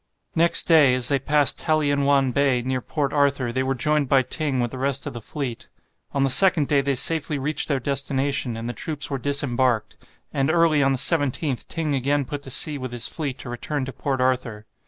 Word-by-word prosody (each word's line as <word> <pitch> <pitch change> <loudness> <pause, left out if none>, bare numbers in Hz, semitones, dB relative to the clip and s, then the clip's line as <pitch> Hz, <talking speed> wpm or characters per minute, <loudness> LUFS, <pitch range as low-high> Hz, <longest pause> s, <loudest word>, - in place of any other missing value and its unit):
Next 170 +1 +4
day, 150 -6 +5
as 125 -1 +2
they 140 -1 +1
passed 145 +1 +1
Talienwan 145 -3 +1
Bay, 130 -2 +1
near 130 0 -2
Port 145 +2 -3
Arthur, 140 -4 +1
they 130 +2 -1
were 135 0 -1
joined 150 +2 0
by 135 -2 +4
Ting 140 0 -1
with 120 -1 -1
the 130 - -7
rest 140 0 -1
of - - -5
the 120 - -8
fleet. 130 -1 -6 0.4
On 140 - 0
the 135 - +1
second 180 -3 +5
day 140 -2 +2
they 140 0 -1
safely 155 +2 +1
reached 150 +3 -1
their 140 -3 0
destination, 135 -2 -1
and 115 +1 -6
the 120 - -4
troops 150 -1 -2
were 135 - -2
disembarked. 130 -4 0 0.4
And 135 +1 0
early 160 -2 +3
on 135 0 +2
the - - -1
17th 145 -2 0
Ting 155 -3 -3
again 140 +1 0
put 145 +2 -6
to 135 - -11
sea 145 +3 0
with 130 -1 -6
his 120 -1 -1
fleet 140 -5 -4
to 125 - -9
return 130 +3 -4
to 135 - -8
Port 135 +2 -3
Arthur. 125 -4 -1
140 Hz, 215 wpm, -23 LUFS, 130-145 Hz, 0.4 s, day